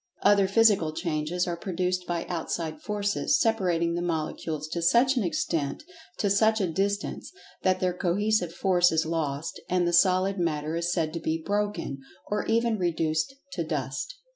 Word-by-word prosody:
Other 200 -1 +5
Physical 195 -6 +4
Changes 165 +1 -1
are 175 - -2
produced 180 0 -2
by 170 -1 -2
outside 160 -2 -4
Forces 205 -1 0
separating 180 -7 +1
the 175 - -2
molecules 155 -2 -3
to 170 - -3
such[Pg 175 +8 +5
85] 270 - 0
an 240 - +2
extent—to 175 - -3
such 220 +2 +3
a 195 - +2
distance—that 200 - -2
their 185 -1 +1
cohesive 185 +1 0
force 175 0 +3
is 160 0 +1
lost, 160 -1 -3
and 180 -1 +2
the 175 - 0
Solid 185 +2 +3
matter 155 -2 -1
is 170 +1 -1
said 160 -3 -1
to 170 - -3
be 160 0 -1
"broken," 205 -9 -2 0.3
or 210 - -1
even 230 -1 +1
reduced 160 +3 0 0.2
to 175 - -2
dust. 150 - -3
175 Hz, 160 wpm, -27 LUFS, 160-200 Hz, 0.3 s, Other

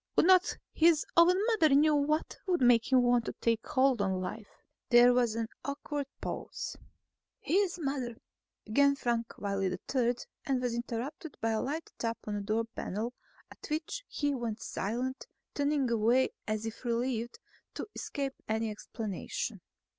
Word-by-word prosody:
"Would - - +5
not 370 0 +5 0.2
his 325 -1 +4
own 345 +2 +6
mother 335 - +4
know 300 +2 +5
what 300 +2 +1
would 360 -2 +2
make 245 0 +4
him 255 -1 +6
want 245 -1 +3
to - - -3
take 230 0 0
hold 260 -4 +3
on 190 -2 0
life?" 200 +3 -5 0.4
There 245 0 +7
was 240 -3 +2
an 230 -1 -1 0.2
awkward 280 +1 -3
pause. - - -5 0.6
"His 390 -3 +1
mother," 270 -6 -2 0.5
began 280 +6 +4
Frank 235 -3 -2
Wiley 195 -1 -1 0.3
III 245 -2 +2 0.3
and 270 -3 0
was 245 -2 -1
interrupted 245 +6 -5
by 225 - 0
a 220 - 0
light 305 +5 -4
tap 230 0 -1
on 210 - -3
the 205 - -2
door 215 +3 0
panel, 220 +6 -3 0.4
at - - -11
which 310 +11 -3
he 290 -1 -1
went 235 -4 -3
silent, 245 +8 -3 0.3
turning 285 -2 +1
away 235 +3 +3 0.2
as 215 0 -1
if 225 +2 -6
relieved 235 0 -1 0.4
to - - -4
escape 275 -2 -3 0.2
any 220 0 0
explanation. 210 -1 -5
245 Hz, 155 wpm, -31 LUFS, 225-285 Hz, 0.6 s, There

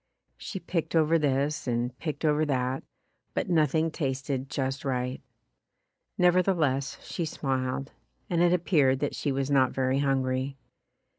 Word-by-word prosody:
She 190 - -6
picked 170 -1 -2
over 165 +1 +4
this 145 0 0
and 120 +1 -1
picked 155 -1 -3
over 150 0 +3
that, 130 -2 -1 0.5
but - - -1
nothing 160 0 +2
tasted 135 -2 -2
just 135 0 -2
right. 125 -1 -2 1.0
Never 180 0 +5
theless 150 -8 0
she 175 - -3
smiled, 135 -3 -2 0.4
and 170 -1 +1
it 175 0 +5
appeared 155 -7 +3
that 145 - 0
she 145 - -1
was 135 +1 -1
not 130 -2 +4
very 130 0 +1
hungry. 135 -1 0
140 Hz, 140 wpm, -28 LUFS, 130-160 Hz, 1.0 s, Never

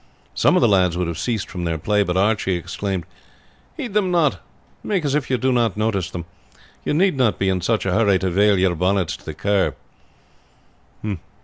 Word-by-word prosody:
Some - - +3
of - - +3
the - - +6
lads 90 -4 +3
would 90 - 0
have 85 -1 -4
ceased 110 -2 -2
from 90 - -6
their 85 -1 -1
play; 105 +6 +1
but 90 -2 0
Archie 100 -1 +1
exclaimed: 90 +1 -4 0.7
"Heed 235 -6 -5
them 205 -3 +2
not; 155 - +2 0.4
make 190 -7 -1
as 140 - 0
if 150 -2 -1
you 130 - +2
did 130 +1 +1
not 115 -4 +1
notice 105 -5 0
them. 85 -1 -6 0.6
You - - -1
need 185 +1 +3
not 125 -5 +2
be 95 - +1
in 95 -1 0
such 110 +4 0
a 95 - 0
hurry 100 -2 +3
to 95 0 -2
vail 100 +2 +4
your 95 -1 +2
bonnets 90 +1 0
to - - -21
the 80 - -6
Kerr." 100 +3 +1
100 Hz, 205 wpm, -21 LUFS, 90-120 Hz, 0.7 s, the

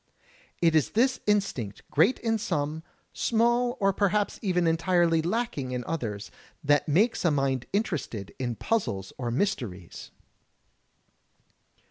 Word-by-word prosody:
It 165 -1 +5
is 155 - +2
this 255 +2 +3
instinct, 165 - 0
great 180 - +4
in 225 -1 0
some, 150 -3 -2 0.3
small 240 +1 +1
or 195 -1 +2
perhaps 205 +1 0
even 180 -4 +1
entirely 165 0 +2
lacking 170 - -2
in 125 -1 -2
others, 105 -10 -4 0.3
that 145 0 +3
makes 205 +10 +2
a 175 - +4
mind 135 -4 0
interested 160 - -2
in 120 -2 -2
puzzles 115 - -2
or 120 -2 -2
mysteries. 115 - -3
165 Hz, 120 wpm, -27 LUFS, 130-210 Hz, 0.3 s, It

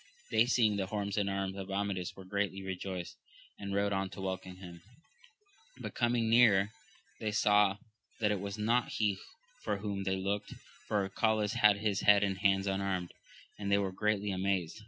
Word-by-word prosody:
They 115 +2 +4
seeing 110 -4 +3
the 95 -1 -1
horse 100 0 -3
and 100 -1 +1
arms 95 -1 -2
of 95 0 -6
Amadis 95 -2 -2
were 95 - -11
greatly 100 0 -2
rejoiced, 95 -1 -5 0.4
and 100 -1 -5
rode 100 0 +1
on 95 0 -1
to 95 - -9
welcome 95 -1 -4
him; 90 -2 -11 1.0
but - - -6
coming 120 -1 +1
nearer, 110 -4 +5 0.5
they 110 -1 -2
saw 105 -1 +4 0.4
that 105 -2 +2
it 105 - 0
was 100 +2 -5
not 115 +3 +1
he 105 -3 0 0.4
for - - -1
whom 100 -1 -3
they 95 0 0
looked, 100 +2 -3 0.3
for 105 -2 +1
Arcalaus 105 +1 +1
had 105 -1 +5
his 105 -1 0
head 105 0 +6
and 95 -1 -1
hands 100 -1 +3
unarmed, 95 -2 -2 0.5
and 100 -1 -2
they 100 - +5
were 100 -2 0
greatly 105 +1 0
amazed. 95 -1 -1
100 Hz, 180 wpm, -32 LUFS, 95-105 Hz, 1.0 s, head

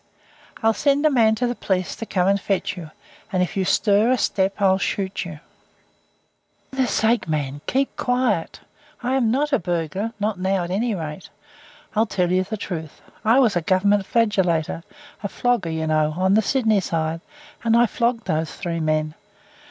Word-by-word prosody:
I'll 225 0 +4
send 280 +6 +2
a 310 - +5
man 225 -4 +4
to 245 - -1
the 240 - 0
police 185 -6 -2
to 225 - -6
come 180 -1 +1
and 200 0 +2
fetch 195 +1 -1
you, 170 -4 -8 0.4
and 185 -2 +2
if 180 - -4
you 195 - +1
stir 205 +4 +3
a 255 - +3
step 195 -2 0
I'll 190 -1 +3
shoot 195 -1 -2
you." 160 -4 -8 1.3
"For 265 - -10
goodness' 260 -2 +2
sake, 225 -2 +2
mate, 145 -2 -2
keep 270 +1 0
quiet. 245 -9 0 0.4
I 250 +2 0
am 255 -4 +2
not 285 +5 0
a 275 - +4
burglar, 175 +5 -2
not 205 -2 -1
now 190 0 0
at 175 - -5
any 220 +3 0
rate. 160 0 -6 0.7
I'll 220 +2 +3
tell 180 -4 0
you 185 +1 +3
the 215 +3 -5
truth. 160 -6 -6 0.2
I 225 +3 +4
was 230 -7 +3
a 175 - +1
Government 195 +4 +2
flagellator, 190 -9 +1 0.4
a 205 - -2
flogger, 235 -4 0
you 160 0 -2
know, 155 -1 +1
on 190 +1 +2
the 215 - +5
Sydney 220 -3 +2
side, 165 -2 -2 0.4
and 230 0 +3
I 240 - +6
flogged 235 +1 -1
those 160 0 -1
three 170 -3 -4
men. 155 -1 0
195 Hz, 185 wpm, -22 LUFS, 170-230 Hz, 1.3 s, I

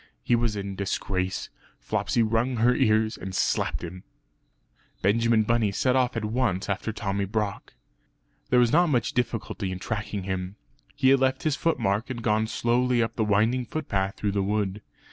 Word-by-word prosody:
He 120 - +3
was 115 -2 0
in 100 -1 -4
disgrace; 95 -1 -2 0.3
Flopsy 85 - 0
wrung 115 +3 +1
her 120 +2 +4
ears, 110 -3 +2
and 95 0 -6
slapped - - 0
him. 90 +2 -7 1.0
Benjamin 115 +2 +3
Bunny 115 -2 +1
set 125 +6 +1
off 125 -2 +1
at 110 - -2
once 110 -4 0
after 100 +3 -2
Tommy 100 -2 -2
Brock. 105 0 -3 0.7
There 125 - +4
was 120 -1 +4
not 175 +2 +4
much 125 -7 0
difficulty 115 -5 -2
in 95 - -4
tracking 105 0 -4
him; 95 0 -4 0.4
he 130 - +3
had 135 0 +5
left 130 0 +1
his 155 -3 +1
foot 165 +2 0
mark 105 +1 0
and 120 -3 -5
gone 110 0 +2
slowly 120 +2 +1
up 115 0 -4
the 110 - +1
winding 110 +4 +2
footpath 100 -11 -2
through 105 - -1
the 100 0 0
wood. 100 0 -1
110 Hz, 175 wpm, -26 LUFS, 100-120 Hz, 1.0 s, had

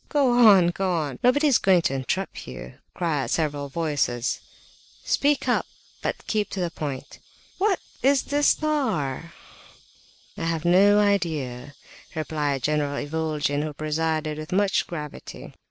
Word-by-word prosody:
"Go 275 -5 +3
on! 190 -4 +7
Go 190 +1 -1
on! 145 -6 -3
Nobody 270 +5 +4
is 280 -5 +4
going 185 -3 +4
to 135 - +1
interrupt 135 +9 -3
you!" 65 -1 -9 0.2
cried 150 -8 -1
several 145 -3 -1
voices. 140 -6 -1 0.7
"Speak, 290 0 +2
but - - -3
keep 210 -2 -1
to 195 - -5
the 175 -2 -1
point!" 140 -4 -6 0.4
"What 390 -1 +2 0.2
is 270 +1 +3
this 290 0 +1
'star'?" 200 - 0
asked - - -24
another. 165 - -2
"I - - +2
have 165 0 -3
no 200 +4 +5
idea," 155 -10 -1 0.4
replied 150 -4 -2
General 150 -1 0
Ivolgin, 150 -2 -1
who 155 0 -4
presided 155 0 -2
with 155 - -8
much 195 +1 +1
gravity. 150 -5 -8
160 Hz, 140 wpm, -25 LUFS, 145-200 Hz, 0.7 s, on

